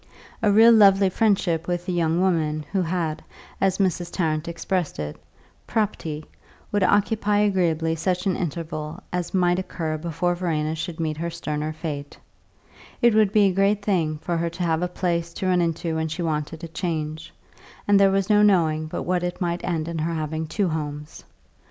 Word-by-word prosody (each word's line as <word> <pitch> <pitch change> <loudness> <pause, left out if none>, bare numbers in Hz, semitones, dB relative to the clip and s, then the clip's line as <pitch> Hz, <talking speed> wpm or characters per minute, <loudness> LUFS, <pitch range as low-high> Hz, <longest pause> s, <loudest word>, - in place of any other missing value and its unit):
A 210 -3 +3
real 225 +3 +7
lovely 195 -3 +6
friendship 190 -6 +1
with 175 0 -2
a - - 0
young 170 -1 +1
woman 155 -5 0
who 195 -1 +1
had, 165 -3 -2 0.4
as 190 -1 +2
Mrs. 180 -3 0
Tarrant 155 -3 -1
expressed 170 0 -2
it, 75 0 -4 0.5
"prop'ty," 160 -8 -2 0.5
would 205 - +1
occupy 205 +1 +2
agreeably 170 -5 +1
such 180 +3 -1
an 190 -3 +1
interval 160 -1 -4
as 180 +1 -2
might 175 -1 +3
occur 160 -4 -3
before 170 +2 -1
Verena 160 -3 -1
should 160 +1 -5
meet 155 -2 -2
her 170 +2 -2
sterner 150 -2 -3
fate; 150 -3 -6 0.8
it 235 -1 +4
would 215 -2 +4
be 210 -1 +4
a 195 -2 +3
great 200 +2 +2
thing 165 -6 +1
for 170 +2 -2
her 170 0 0
to 170 +2 -5
have 165 -1 +1
a 180 - +1
place 170 -2 -2
to - - -4
run 180 -1 +3
into 165 0 -1
when 160 0 -1
she 160 +3 -4
wanted 155 +1 -3
a - - -4
change, 160 -2 -4 0.6
and 205 -1 +5
there 195 0 +6
was 195 0 +1
no 210 -1 +4
knowing 160 -6 +3
but - - -4
what 180 0 0
it 175 0 -3
might 175 -1 -2
end 165 -3 -2
in 170 -1 -3
her 165 +2 -1
having 155 0 -3
two 195 +4 0
homes. 150 -1 -5
170 Hz, 185 wpm, -24 LUFS, 160-190 Hz, 0.8 s, real